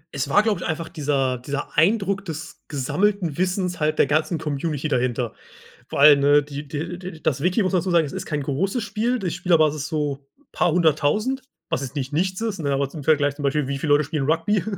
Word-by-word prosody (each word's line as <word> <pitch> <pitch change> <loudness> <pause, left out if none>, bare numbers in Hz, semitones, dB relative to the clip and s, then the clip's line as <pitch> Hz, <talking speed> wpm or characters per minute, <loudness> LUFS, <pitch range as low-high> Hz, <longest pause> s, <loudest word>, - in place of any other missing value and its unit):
Es 140 +1 -2
war, 205 +9 +4
glaube 220 -2 0
ich, - - -3
einfach 160 0 -3
dieser 140 -5 -1
dieser 140 +3 -5
Eindruck 195 +3 +2
des 160 -2 -7
gesammelten 160 +5 0
Wissens 180 -1 -1
halt 155 0 0
der - - +5
ganzen 155 +4 +1
Community 150 0 -2
dahinter. 125 -3 -1 0.5
Vor - - -4
allen, 145 0 +8
ne, 145 +1 +5
die 145 0 -7
der 160 +5 -4
der 185 0 -7
das 140 -3 -1
Wiki, 180 +5 +2
muss 190 0 0
man 180 - +3
dazu 185 - -2
sagen, 170 -3 +3
es 135 - -8
ist - - -5
kein 150 -2 -2
großes 190 - -1
Spiel. 230 +4 -1
Die 190 -4 -2
Spielerbasis 160 -4 +2
ist - - -4
so 145 -3 -3 0.3
paar 175 - +1
hunderttausend, 175 - +1 0.3
was - - -1
jetzt 135 0 -5
nicht 135 0 -3
nichts 185 +6 -1
ist, 220 -3 -2
ne, 140 -3 0
aber 135 0 0
zum 150 -1 -8
Vergleich 145 -1 +2
zum 145 - -7
Beispiel, 140 0 0
wie 140 0 -2
viele 145 +2 -1
Leute 150 - +4
spielen 150 -1 -2
Rugby 165 +6 +1
155 Hz, 225 wpm, -23 LUFS, 145-180 Hz, 0.5 s, allen